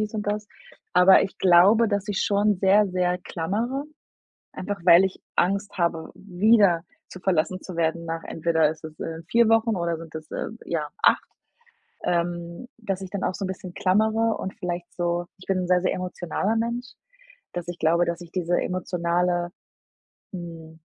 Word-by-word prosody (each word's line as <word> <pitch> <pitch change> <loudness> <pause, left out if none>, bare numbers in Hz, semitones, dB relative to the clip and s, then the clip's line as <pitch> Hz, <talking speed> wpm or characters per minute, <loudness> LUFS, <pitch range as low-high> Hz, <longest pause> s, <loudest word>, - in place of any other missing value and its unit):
dies 215 +1 -3
und 210 - -2
das, 210 0 -2 0.5
aber 180 +2 +7
ich 190 - -4
glaube, 190 +6 +6
dass 205 0 -2
ich 200 - 0
schon 205 0 +2
sehr, 200 +2 +4
sehr 180 -1 0
klammere, 220 - -3 0.7
einfach 200 +1 -5
weil 175 +1 +8
ich 190 - -3 0.2
Angst 200 +3 0
habe, 165 -2 -1
wieder 195 -2 +3 0.3
zu 185 - -11
verlassen 185 0 0
zu 180 -3 -8
werden 170 0 0
nach, 165 0 -4
entweder 160 -1 +1
ist 160 - -9
es, 155 0 -9
äh, 165 0 -5
4 230 +3 +4
Wochen 225 -2 +3
oder 170 -1 -1
sind 165 -1 -11
es, 155 -1 -9
äh, - - -3 0.2
ja 155 -3 -2
8, - - +5 0.8
ähm, 170 +4 -2
dass 195 -4 -4
ich 190 - -7
dann 200 0 -4
auch - - -1
so 200 - -5
'n - - -3
bisschen 185 -1 -7
klammere 220 +4 +2
und 190 - -5
vielleicht 175 -4 -4
so 175 0 -1
ich 185 - -15
bin 195 - +1
'n 180 - -2
sehr, 180 -1 +3
sehr 185 - +1
emotionaler 185 +3 -2
Mensch, 235 +2 -2 0.6
dass 175 0 -5
ich 175 0 -5
glaube, 170 +2 +3
dass 170 +1 -3
ich 170 0 -11
diese 175 -1 0
emotionale, 175 -1 -1 0.8
hm, 165 -3 -9
180 Hz, 180 wpm, -25 LUFS, 170-205 Hz, 0.8 s, weil